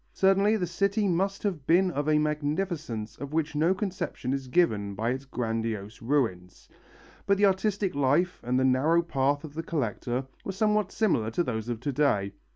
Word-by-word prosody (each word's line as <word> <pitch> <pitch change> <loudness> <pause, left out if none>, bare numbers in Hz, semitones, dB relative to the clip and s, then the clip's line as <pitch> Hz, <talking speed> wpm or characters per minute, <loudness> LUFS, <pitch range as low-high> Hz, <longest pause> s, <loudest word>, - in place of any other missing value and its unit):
Certainly 195 +3 +3
the 180 - -1
city 200 +4 0
must 195 +2 0
have 180 -10 -2
been 180 +2 +4
of 145 -1 -1
a 155 - +4
magnificence 150 - -2
of 140 +2 -7
which 160 0 0
no 160 +4 +3
conception 180 -9 -3
is 135 -1 -3
given 110 - +1
by 115 +4 -1
its 135 +2 -4
grandiose 115 -4 -3
ruins. 115 -9 -1 0.6
But 200 0 +4
the 205 - +4
artistic 195 0 +1
life, 145 +6 +1
and 125 +2 +1
the 130 - +2
narrow 150 +7 +3
path 145 -2 0
of 155 -2 -9
the 160 - -3
collector, 135 -5 -2 0.2
were 195 - -4
somewhat 210 0 +1
similar 140 - +1
to 120 +10 0
those 110 -5 -3
of 120 -1 -3
to 140 - -1
day. 105 -9 +1
150 Hz, 180 wpm, -28 LUFS, 125-185 Hz, 0.6 s, been